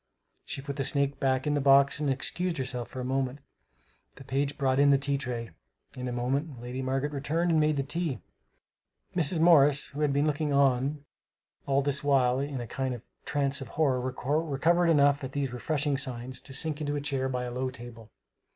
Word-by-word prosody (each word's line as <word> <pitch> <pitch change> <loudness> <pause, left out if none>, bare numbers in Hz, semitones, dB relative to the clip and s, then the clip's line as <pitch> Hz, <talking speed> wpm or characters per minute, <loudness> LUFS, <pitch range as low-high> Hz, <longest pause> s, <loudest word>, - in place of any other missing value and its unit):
She 135 - -5
put 140 0 -5
the 135 - 0
snake 140 0 0
back 130 -1 +1
in 150 - +1
the 145 - +1
box 140 +1 +5
and 150 -2 0
excused 170 +6 -1
herself 125 -2 -3
for 130 - -7
a - - -4
moment. 130 0 -1 0.8
The 135 - -12
page 140 +2 -1
brought 135 -2 +1
in 140 0 +6
the 140 - +6
tea 140 +1 -1
tray. 120 -3 -4 0.4
In 125 0 -5
a - - -2
moment 130 +3 -2
Lady 125 +2 -5
Margaret 135 +2 -1
returned 155 +5 0
and 160 - +4
made 155 -1 +2
the 140 - +1
tea, 150 -3 -2 1.0
Mrs. 165 -1 +1
Morris 150 -4 +5
who 145 +1 -6
had 150 -2 +2
been 140 +2 +2
looking 150 0 0
on 140 +1 +2 0.6
all 140 0 +2
this 140 0 -1
while 130 -3 +3
in 140 -1 -3
a 120 - -4
kind 130 +1 -3
of 120 - -11 0.2
trance 140 -1 0
of 135 - -6
horror, 135 -5 +2
recovered 150 +6 +1
enough, 145 -2 +4
at 130 0 -5
these 140 -3 -2
refreshing 145 +2 -1
signs, 130 -1 -4
to - - -12
sink 155 +2 -2
into 145 -1 -1
a - - -1
chair 135 -2 -1
by 125 -1 -2
a 125 - -4
low 130 +1 -1
table. 120 -3 -11
140 Hz, 205 wpm, -28 LUFS, 130-145 Hz, 1.0 s, in